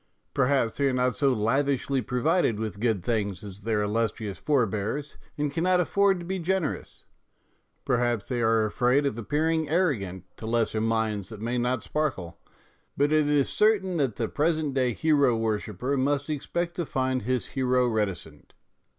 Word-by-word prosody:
Perhaps 135 -4 +1
they 140 - +1
are 135 - +1
not 125 0 +1
so 140 -2 +2
lavishly 135 +4 +1
provided 125 - +1
with 110 -2 -4
good 110 -5 0
things 105 -4 -1
as 100 -1 -9
their 105 0 0
illustrious 105 -1 -2
for 140 -5 +2
bears, 110 +8 -4 0.2
and 145 -1 -1
cannot 180 +3 +2
afford 195 +2 +3
to 170 - -7
be 190 +2 -3
generous; 180 -2 -2 0.8
perhaps 120 -3 0
they 125 -2 -1
are 115 -1 +3
afraid 125 +6 +2
of 140 - 0
appearing 155 +6 0
arrogant 115 - 0
to 110 - -7
lesser 115 -1 0
minds 110 -3 -1
that 110 -3 -9
may 120 +3 -1
not 125 0 0
sparkle; 135 - -3 0.6
but 145 +1 +2
it 155 -1 +3
is 145 -2 +3
certain 195 -4 +2
that 135 -8 0
the 115 - -1
present 155 0 0
day 130 -2 +1
hero 140 -2 +2
worshipper 110 +3 -2
must 145 +2 0
expect 170 +4 -2
to 175 - -1
find 130 -1 0
his 125 +1 -2
hero 125 -1 +1
reticent. 100 -9 -3
125 Hz, 165 wpm, -26 LUFS, 110-150 Hz, 0.8 s, afford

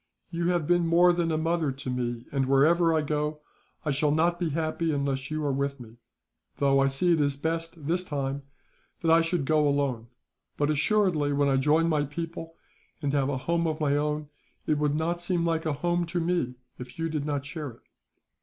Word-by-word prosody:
"You 170 0 -1
have 175 -3 +1
been 175 +1 +2
more 175 +2 +5
than 170 -1 0
a 155 - +1
mother 165 -2 0
to 135 0 -6
me 120 -1 -3
and, 135 -2 0
wherever 165 +5 +4
I 160 -1 +2
go, 150 0 -2 0.4
I 150 - +1
shall 150 +2 +1
not 170 +3 +2
be 175 -3 0
happy 160 +1 -1
unless 140 -2 -2
you 155 -1 -2
are 140 - +1
with 140 0 -2
me, 115 -1 -12 0.6
though 140 -1 +3
I 135 - +4
see 155 +6 +2
it 160 - +2
is 140 -1 +1
best, 165 +1 -3
this 175 +4 0
time, 140 -4 -3 0.6
that 165 - +3
I 165 0 +6
should 165 -3 -1
go 150 0 +3
alone; 140 -5 0 0.5
but 145 +1 +1
assuredly, 155 -3 +2
when 140 0 +2
I 135 - +3
join 150 +5 +3
my 155 -3 +2
people, 165 +2 -6 0.4
and 145 -3 -2
have 140 -1 +1
a 140 - -1
home 170 +5 0
of 155 0 -2
my 145 -2 +2
own, 150 0 -1 0.4
it 150 - +1
would 150 -1 +1
not 170 +2 -1
seem 175 -1 0
like 165 -1 0
a 155 - +1
home 175 +3 0
to 175 +1 -2
me 165 -7 0 0.2
if 125 0 -9
you 165 0 -1
did 155 -3 -2
not 145 -2 -2
share 150 -1 -5
it." 115 - -15
150 Hz, 210 wpm, -27 LUFS, 140-165 Hz, 0.6 s, I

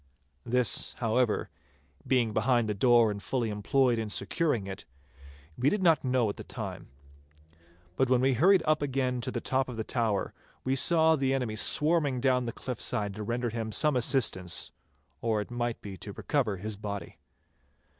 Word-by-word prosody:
This, 125 0 +1
however, 115 -1 0 0.6
being 120 -4 +2
behind 120 +1 +2
the 105 - -1
door 115 +1 +4
and 100 -1 -6
fully 120 -1 -2
employed 120 +3 +1
in 110 -1 -3
securing 105 - -1
it, 95 -1 -7 0.7
we 130 +3 +2
did 210 +2 -1
not 165 -3 +4
know 125 -3 +1
at 100 - -4
the - - -7
time. - - -7 1.1
But 130 -1 +2
when 125 -1 +4
we 130 +1 +2
hurried 175 - +4
again 135 -5 0
to - - -3
the - - -3
top 130 0 -1
of 120 - -7
the 110 - -2
tower, 110 -4 -1 0.3
we 130 +1 0
saw 160 +4 +4
the 135 -2 0
enemy 125 -5 -2
swarming 150 +2 +2
down 125 -1 +1
the - - -2
cliff 125 0 -6
side 105 -4 -1
to 105 - -7
render 120 +2 -2
him 115 -1 -4
some 150 +4 +2
assistance, 120 - +1 0.5
or 110 -2 0
it 105 - -6
might 120 -1 -2
be 100 -2 -7
to 100 - -8
recover 120 -8 -1
his 105 +3 -4
body. 100 -1 -7
120 Hz, 175 wpm, -29 LUFS, 110-135 Hz, 1.1 s, door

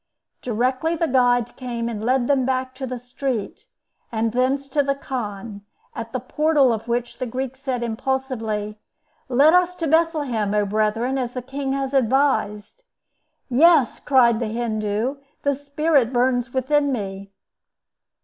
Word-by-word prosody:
Directly 255 +7 0
the 330 0 0
guide 245 -2 +2
came, 240 -2 -4
and 220 -2 -4
led 250 +1 +2
them 275 0 +2
back 260 0 -1
to 260 0 -6
the 255 0 -4
street, 245 -2 -4 0.5
and 225 0 0
thence 260 +3 0
to 290 +2 +2
the 275 0 0
khan, 210 -6 -5 0.3
at 230 0 -6
the 255 - -2
portal 285 0 +2
of 225 +1 -5
which 240 0 -2
the 255 - -2
Greek 260 +2 -4
said, 260 -3 -3
impulsively, 225 -3 -3 0.5
"Let 280 +6 +5
us 360 0 +3
to 335 - -3
Bethlehem, 290 -10 +1
O 210 -1 +2
brethren, 215 +5 0
as 245 -1 -3
the 250 - -5
king 270 +1 -3
has 275 0 -2
advised." 260 - +1 0.6
"Yes," 285 0 +4
cried 240 -5 +4
the 235 - -1
Hindoo. 220 +2 -2 0.3
"The 285 - +2
Spirit 285 -2 +1
burns 245 -1 +1
within 285 +2 +1
me." 195 -4 -5
255 Hz, 150 wpm, -22 LUFS, 230-275 Hz, 0.6 s, Let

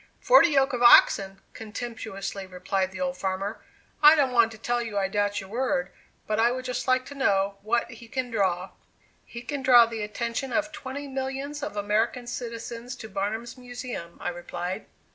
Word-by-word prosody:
"Forty - - +6
yoke 275 -2 +2
of 245 - -2
oxen!" 195 -5 +6
contemptuously 215 -3 -6
replied 185 +1 -2
the 190 - -8
old 180 0 -2
farmer; 195 +3 -3 0.4
"I 300 +1 +9
don't 280 -4 +2
want 235 -2 +4
to 220 - -10
tell 240 +2 -1
you 225 -3 -4
I 195 -1 +1
doubt 205 +1 0
your 195 - -9
word, 265 +3 -1 0.3
but 215 0 -1
I 230 +1 +5
would 255 0 -4
just 250 0 -3
like 255 0 +2
to 285 - -9
know 200 -7 +1
what 235 +3 0
he 230 0 -12
can 255 0 -3
draw." 190 -4 0 0.5
"He 235 0 -9
can 280 +3 -4
draw 245 -2 +7
the 225 -1 -5
attention 235 +5 -3
of 305 0 0
twenty 280 0 -6
millions 270 +2 -4
of 280 -7 -5
American 215 +4 0
citizens 235 0 -6
to 220 -3 -9
Barnum's 220 +6 -3
Museum," 245 -8 -7
I - - -2
replied. 175 +2 -5
230 Hz, 180 wpm, -26 LUFS, 200-255 Hz, 0.5 s, I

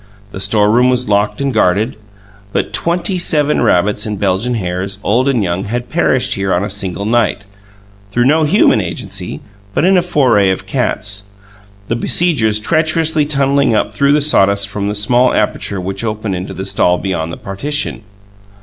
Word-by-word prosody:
The 95 - -7
storeroom 110 +5 +3
was 125 -1 0
locked 105 +4 0
and 140 -1 -1
guarded, 105 +2 +1 0.6
but - - -2
twenty 175 +8 0
seven 150 -3 +2
rabbits 105 +4 +2
and 105 -3 -4
Belgian 100 +5 0
hares, 95 -1 -3
old 125 +6 +1
and 125 -6 +1
young, 90 +1 -2
had 120 +3 -4
perished 130 -7 +1
here 95 -1 -2
on 90 - 0
a 100 - -3
single 100 0 -3
night 110 -2 +1 0.7
through 120 +4 +1
no 155 +4 +3
human 150 - +3
agency, - - -6 0.3
but - - +2
in 190 0 +4
a - - +4
foray 130 - +2
of 95 0 -2
cats, 105 -3 -2 0.6
the 115 - -1
besiegers 120 -6 +1
treacherously 155 +3 +1
tunnelling 140 -3 +2
up - - -1
through 140 0 +2
the 150 - +3
sawdust 100 -8 +2
from 100 0 -3
the 105 - -2
small 120 +5 +2
aperture 105 -2 -1
which 95 +3 -4
opened 110 -3 -3
into 90 +2 -6
the 95 - -5
stall 95 -2 +1
beyond 85 -4 -3
the - - -7
partition. 140 +5 -3
110 Hz, 170 wpm, -15 LUFS, 100-140 Hz, 0.7 s, in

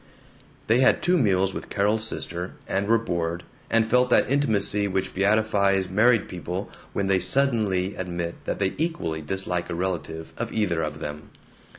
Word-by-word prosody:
They 115 +3 +3
had 130 - +4
two 180 - +3
meals 95 - +2
with - - -7
Carol's 105 +2 +1
sister, 90 -3 -5
and 100 +1 -1
were 115 +1 +5
bored, 85 -5 -2 0.3
and 115 -1 +3
felt 125 +2 +3
that - - +4
intimacy 110 -7 +2
which 95 -1 -2
beatifies 100 -1 +2
married 110 +2 +4
people 90 +2 -5 0.2
when 100 - -1
they 95 -1 +3
suddenly 100 -4 +1
admit 85 -2 -4
that - - -2
they 95 -1 0
equally 155 - -2
dislike 90 +1 -2
a - - -3
relative 85 -3 -4
of - - -3
either 90 -7 0
of 75 -1 -4
them. 75 +1 -6
95 Hz, 165 wpm, -25 LUFS, 90-110 Hz, 0.3 s, were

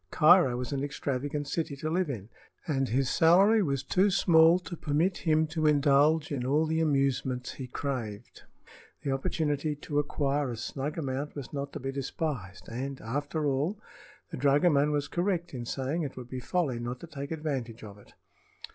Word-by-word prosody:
Cairo 155 -6 +5
was 125 +2 -4
an 140 -1 -2
extravagant 145 +1 -3
city 150 -1 -2
to 145 +3 -5
live 175 +1 0
in, 110 -6 -5 0.4
and 135 -6 0
his 130 +3 +1
salary 195 - +5
was 140 -7 -1
too 190 +8 +2
small 170 -3 +5
to 180 -1 -7
permit 165 +5 0
him 160 -2 +2
to 155 0 0
indulge 145 +2 +3
in 135 -4 -2
all 145 +5 +2
the 160 +1 0
amusements 135 -4 0
he 130 - -7
craved. 120 -5 -5 0.6
The 140 - -1
opportunity 145 +2 -1
to 145 0 -2
acquire 145 -1 0
a 120 - -5
snug 135 +7 -4
amount 140 -1 -3
was 140 -1 -7
not 140 0 -4
to 150 - -5
be 135 0 -3
despised, 135 - -4
and, 130 +4 -5
after 145 +6 -3
all, 145 +9 0 0.5
the - - -5
dragoman 145 +2 +3
was 145 -1 -1
correct 175 -2 -1
in 120 -2 -5
saying 135 +7 -2
it 145 -5 -5
would 125 -1 -9
be 130 - -4
folly 135 -3 -1
not 120 +1 -4
to - - -7
take 140 -3 -7
advantage 135 -8 -4
of 105 -1 -10
it. - - -19
145 Hz, 180 wpm, -29 LUFS, 130-160 Hz, 0.6 s, Cairo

